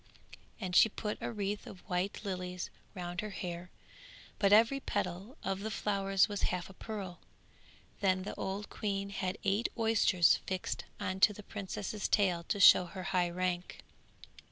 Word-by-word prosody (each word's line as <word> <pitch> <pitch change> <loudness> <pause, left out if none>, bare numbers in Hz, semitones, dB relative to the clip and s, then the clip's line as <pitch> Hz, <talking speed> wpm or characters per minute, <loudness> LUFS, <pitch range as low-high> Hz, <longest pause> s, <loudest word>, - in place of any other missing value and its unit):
and 185 -4 -3
she 220 - +8
put 210 0 -4
a - - -2
wreath 205 -1 -3
of 180 - -12
white 185 +3 -1
lilies 180 -2 -4 0.2
round 175 -1 -4
her 215 - -5
hair, 180 -2 -5 0.7
but 200 -1 +4
every 230 +6 +6
petal 200 - -3
of 195 0 -1
the 215 +2 -3
flowers 195 -3 +2
was 205 -1 -4
half 180 +1 -3
a - - -14
pearl; 195 -4 -6 0.8
then 185 -2 +2
the - - -5
old 195 +2 -4
queen 200 -2 -3
had 185 -2 -2
eight 205 +4 +1
oysters 220 -6 +4
fixed 185 -1 -3
on 185 0 -2
to 210 - +6
the 210 - -10
princess's 205 0 -4
tail 185 -5 +2
to 200 - -1
show 185 -1 +9
her 185 +1 -7
high 180 -1 +3
rank. 180 0 -2
195 Hz, 160 wpm, -33 LUFS, 180-205 Hz, 0.8 s, show